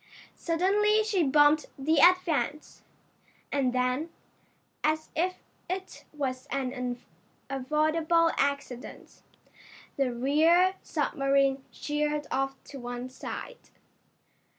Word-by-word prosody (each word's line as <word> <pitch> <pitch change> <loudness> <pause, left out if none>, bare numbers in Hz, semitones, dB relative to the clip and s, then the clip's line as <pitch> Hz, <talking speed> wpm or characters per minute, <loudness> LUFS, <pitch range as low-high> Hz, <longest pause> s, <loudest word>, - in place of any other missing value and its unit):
Suddenly 410 +6 +2
she 420 -4 +1
bumped 295 +1 +4
the 305 +4 +1
Advance, 340 -4 +2 0.7
and 270 -3 +1
then, 255 +5 0 0.7
as 310 +1 0
if 365 +3 0 0.3
it 375 +1 -5
was 260 -4 -4
an 250 -2 -3 0.5
unavoidable 310 +5 +2
accident, 280 -3 -3 0.8
the 270 -3 +1
rear 315 +9 +3
submarine 275 -2 +1
sheered 295 0 -2
off 270 0 -1
to 275 - -10
one 245 +1 -6
side. - - -8
295 Hz, 90 wpm, -28 LUFS, 270-330 Hz, 0.8 s, bumped